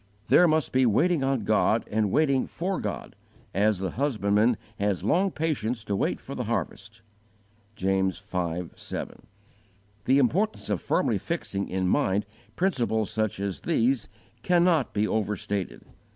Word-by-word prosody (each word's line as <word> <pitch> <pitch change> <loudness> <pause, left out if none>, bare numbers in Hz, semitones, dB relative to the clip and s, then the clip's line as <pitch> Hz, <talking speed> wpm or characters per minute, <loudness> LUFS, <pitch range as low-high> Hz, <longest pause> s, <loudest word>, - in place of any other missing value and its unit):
There 180 - +7
must 155 -2 +1
be 130 -1 +3
waiting 155 - +2
on 135 -4 0
God 110 +2 +2
and 105 -1 +1
waiting 140 +2 +2
for 185 +3 -3
God, - - -5 0.4
as 105 +2 +2
the 95 -1 -3
husbandman 110 -4 +1 0.2
has 100 -3 0
long 180 - +2
patience 130 - -2
to 100 -2 -2
wait - - 0
for - - -9
the - - -3
harvest. 110 +4 -4 0.7
(James 95 -2 0
v. 100 - -17
7; 90 -2 0
Luke 85 +1 -6
xviii. - - -5
1 - - -4
10.) - - -16 0.9
The 130 - +4
importance 175 - +1
of 100 - 0
firmly - - +1
fixing 100 0 -3
in 95 0 -1
mind 95 +2 +1 0.3
principles 120 - 0
such 110 -3 -1
as 100 -2 -3
these 130 -7 +1 0.3
cannot 175 -6 +3
be 105 +1 +2
overstated. 105 -3 -2
110 Hz, 155 wpm, -26 LUFS, 100-140 Hz, 0.9 s, There